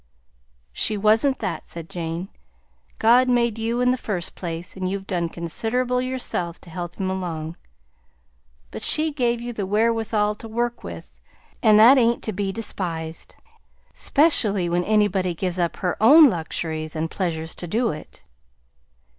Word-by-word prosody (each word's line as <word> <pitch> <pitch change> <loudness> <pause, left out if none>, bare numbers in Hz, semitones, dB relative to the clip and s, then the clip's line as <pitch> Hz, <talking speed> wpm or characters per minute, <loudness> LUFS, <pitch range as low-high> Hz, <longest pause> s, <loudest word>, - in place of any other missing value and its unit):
"She 215 - 0
wasn't 220 +7 +3
that," 160 - -4
said 170 -1 -8
Jane. 170 +2 -5 0.7
"God 245 +3 +4
made 235 -2 +1
you 230 +2 -1
in 250 0 +3
the 255 - 0
first 190 -8 -4
place, 170 0 -6
and 185 -1 -3
you've 195 0 -4
done 175 -4 -2
considerable 235 +10 -1
yourself 250 -9 -3
to 170 - -14
help 175 0 -6
Him 190 - -3
along; 170 -4 -4 1.2
but - - -7
she 310 +1 +3
gave 240 -4 0
you 240 0 -5
the 205 -4 -4
wherewithal 220 0 +1
to 220 +2 -10
work 240 +2 -2
with, 70 -8 -10 0.4
and 215 -1 +6
that 250 +5 +8
ain't 235 -1 +2
to 215 - -2
be 195 0 -2
despised; 170 -7 -5 0.6
specially 215 - +3
when 175 +1 0
anybody 200 -4 +1
gives 180 +1 -3
up 170 -1 0
her 180 +1 -3
own 285 +4 +8
luxuries 160 -2 -4
and 160 +1 -2
pleasures 160 -4 -3
to 175 - -6
do 230 +7 0
it. 155 - -11
200 Hz, 155 wpm, -23 LUFS, 170-235 Hz, 1.2 s, that